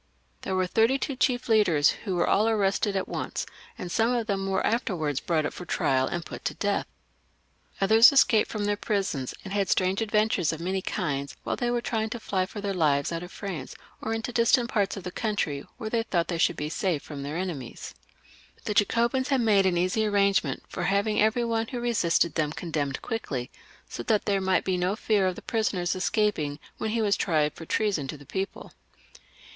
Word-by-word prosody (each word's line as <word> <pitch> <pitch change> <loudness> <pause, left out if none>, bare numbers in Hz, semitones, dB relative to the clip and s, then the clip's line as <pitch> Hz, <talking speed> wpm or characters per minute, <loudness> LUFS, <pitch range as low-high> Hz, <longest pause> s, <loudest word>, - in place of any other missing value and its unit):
There 190 - -2
were 185 0 +2
thirty 225 +8 +3
two 275 0 -3
chief 250 -1 +1
leaders, 185 -10 +4
who 190 -4 -4
were 175 - +1
aU 215 +2 +3
arrested 205 -1 +1
at 190 - -1
once, - - -3 0.3
and 180 - -6
some 225 +6 +2
of 235 -2 -1
them 195 -3 -1
were 190 - 0
afterwards 175 - 0
brought 160 -3 0
up - - -3
for - - -8
trial, 130 -5 +1
and 175 -1 -3
put - - -8
to - - -1
death. 205 -1 -1 0.9
Others 220 +6 +7
escaped 245 -6 +4
from 210 -2 -2
their 205 0 +1
prisons 195 - -2
and 195 - -6
had 200 -2 0
strange 190 +2 +2
adventures 210 -6 +1
of 160 - -5
many 185 +3 -1
kinds 140 -6 -3
while - - -1
they 240 - -1
were 240 0 0
trying 220 -1 -1
to 235 - -5
fly 185 -4 -1
for 205 - -7
their 200 -1 -2
lives 145 -5 +2
out 165 0 -3
of 180 +1 -9
France, 180 -10 -6 0.3
or 220 - -3
into 225 +2 -3
distant 235 +1 +3
parts 205 -2 0
of 195 - -7
the 180 - -5
country, 180 -10 -2
where 215 -1 -5
they 230 - +2
thought 180 -7 -1
they 170 -2 -2
should - - +3
be 150 - -2
safe 160 -1 -1
from 145 -2 -7
their 145 +2 -5
enemiea 170 -10 -5 0.7
The 210 - -1
Jacobins 235 +5 +2
had 270 -3 +2
made 205 -4 +4
an 175 -2 +1
easy 185 +5 +1
arrangement 200 -1 +1
for 175 - -4
having 200 +3 +1
every 220 +3 +2
one 225 -1 0
who 245 - -4
resisted 175 -9 +1
them 150 -2 0
condemned 145 -6 -3
quickly, 140 - -4 0.4
so - - -6
that 210 - +1
there 200 -2 +1
might 190 -1 +1
be 185 -1 +1
no 180 +3 0
fear 210 -3 +1
of 185 - -1
the - - -10
prisoner 215 -5 0
escaping 185 -5 0 0.2
when 220 - -1
he 225 +1 0
was 200 -1 +3
tried 155 -4 +1
for 165 - -10
treason 195 -10 0
to 150 - -6
the 145 - -15
people. 190 +6 -5
195 Hz, 210 wpm, -27 LUFS, 170-220 Hz, 0.9 s, Others